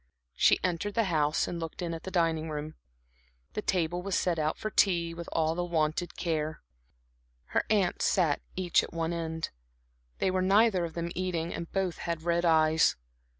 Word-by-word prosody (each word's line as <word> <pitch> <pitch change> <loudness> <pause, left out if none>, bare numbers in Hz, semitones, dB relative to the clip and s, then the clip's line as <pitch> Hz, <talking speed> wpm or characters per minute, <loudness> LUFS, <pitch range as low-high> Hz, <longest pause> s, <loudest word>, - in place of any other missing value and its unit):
She - - +4
entered 185 +3 -1
the 230 - +3
house 150 0 +2
and 170 - -4
looked 165 -1 -6
in 170 -2 -2
at 165 - -5
the - - -3
dining 165 -3 +1
room; 150 0 -4 0.8
the - - -2
table 175 -3 0
was 195 +1 -1
set 175 -3 0
out 155 0 0
for 215 - -4
tea 170 -5 +2
with 170 0 -7
all 160 0 +1
the 175 +1 -2
wonted 170 0 -1
care. 155 -3 -2 0.9
Her - - +1
aunts 200 -5 +2
sat 165 -7 +2
each 180 -2 +3
at - - -8
one 165 0 -1
end; 160 -1 -3 0.7
they 190 - +1
were 185 0 +1
neither 195 -1 +4
of 165 - -8
them 170 0 -3
eating 175 -2 -2
and 170 - -6
both 190 -3 -1
had 170 -2 -3
red 170 0 +1
eyes. 160 -1 +4
170 Hz, 185 wpm, -29 LUFS, 160-180 Hz, 0.9 s, She